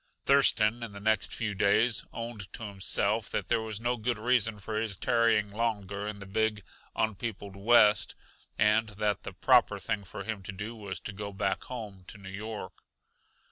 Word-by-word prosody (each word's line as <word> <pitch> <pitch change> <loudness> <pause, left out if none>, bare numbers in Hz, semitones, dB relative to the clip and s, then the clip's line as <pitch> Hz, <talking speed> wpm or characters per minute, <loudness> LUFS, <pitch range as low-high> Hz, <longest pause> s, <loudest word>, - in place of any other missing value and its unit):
Thurston, 120 -5 +5
in 115 -3 -6
the 100 - -8
next 110 +2 +1
few 110 -3 -2
days, 110 +4 +3
owned 115 -4 -6
to - - -6
himself 100 +1 0
that - - -2
there 115 - +2
was 110 -2 -5
no 120 +1 0
good 120 +1 -1
reason 110 -1 +1
for 110 +2 -3
his 105 -4 -2
tarrying 115 -2 +2
longer 105 -2 -2
in 105 -1 -4
the 100 - -9
big, 105 +1 0 0.3
un 110 -1 +1
peopled 100 -2 -6
West, 105 -2 +4 0.4
and 105 +1 +3
that 105 -3 0
the - - -7
proper 120 +1 +4
thing 100 +2 -3
for 100 +1 -7
him 105 -1 -4
to 95 - -6
do 105 +4 -6
was 100 -5 -6
go 100 0 -5
back 95 -1 -1
home 105 -7 -7
to - - -9
New 100 -1 -10
York. 105 +2 -6
105 Hz, 180 wpm, -30 LUFS, 100-115 Hz, 0.4 s, Thurston